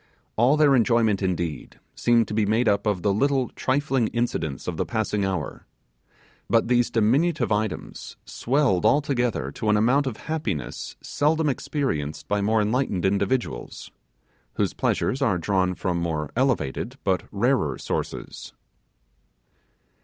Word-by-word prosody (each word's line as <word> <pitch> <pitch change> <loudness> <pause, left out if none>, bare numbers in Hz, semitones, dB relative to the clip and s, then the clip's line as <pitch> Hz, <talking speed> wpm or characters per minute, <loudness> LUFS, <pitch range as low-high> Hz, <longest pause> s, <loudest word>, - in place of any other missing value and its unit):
All 125 +7 +4
their 145 -3 +5
enjoyment, 115 -4 +2
indeed, 85 -4 -3
seemed 120 -1 +2
to - - -5
be 105 -1 +1
made 110 +3 +2
up 100 +1 +2
of 100 -4 0
the 100 - +2
little 135 +3 +1
trifling 135 -3 0
incidents 85 - -2
of 90 - -2
the - - 0
passing 110 -3 -1
hour; 95 -6 -3 0.8
but 115 0 +3
these 120 0 +2
diminutive 125 +4 +1
items 105 -1 -3
swelled 130 -8 +1
altogether 125 - +1
to 105 - -3
an 105 - +4
amount 130 +6 +3
of 115 -4 -4
happiness 110 - -4
seldom 155 +2 +1
experienced 100 - -3
by 105 0 0
more 110 +1 +2
enlightened 105 -5 0
individuals, 100 - -2 0.6
whose - - 0
pleasures 135 - 0
are 110 -9 +2
drawn 90 0 0
from 90 -1 -2
more 80 -3 -2
elevated 125 - -1
but 95 -2 +1
rarer 105 - +1
sources. - - -5
110 Hz, 135 wpm, -24 LUFS, 95-130 Hz, 0.8 s, their